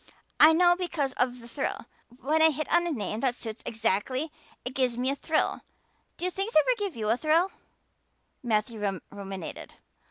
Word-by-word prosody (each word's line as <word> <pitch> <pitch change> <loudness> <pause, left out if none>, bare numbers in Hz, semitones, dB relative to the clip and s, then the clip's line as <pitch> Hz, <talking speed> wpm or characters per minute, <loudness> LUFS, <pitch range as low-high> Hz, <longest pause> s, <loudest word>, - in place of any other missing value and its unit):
I 310 - +9
know 350 +1 +5
because 335 -7 -2
of 250 -1 0
the 235 - -10
thrill. 270 +4 -3 0.3
When 305 +5 +1
I 320 - +8
hit 310 0 -3
on 345 0 +4
a - - -1
name 215 - -3
that 250 -1 +1
suits 225 -2 -7
exactly 230 +7 -1 0.3
it 250 - -4
gives 255 -3 +1
me 255 +2 +1
a - - -2
thrill. 310 +2 0 0.6
Do 365 +1 -1
things 390 +5 -3
ever 405 +11 +5
give 400 -4 -3
you 215 -2 -2
a 230 - +2
thrill?" 325 +6 +2 0.9
Matthew 210 -4 -1
ruminated. 195 -3 -7
260 Hz, 170 wpm, -28 LUFS, 225-320 Hz, 0.9 s, I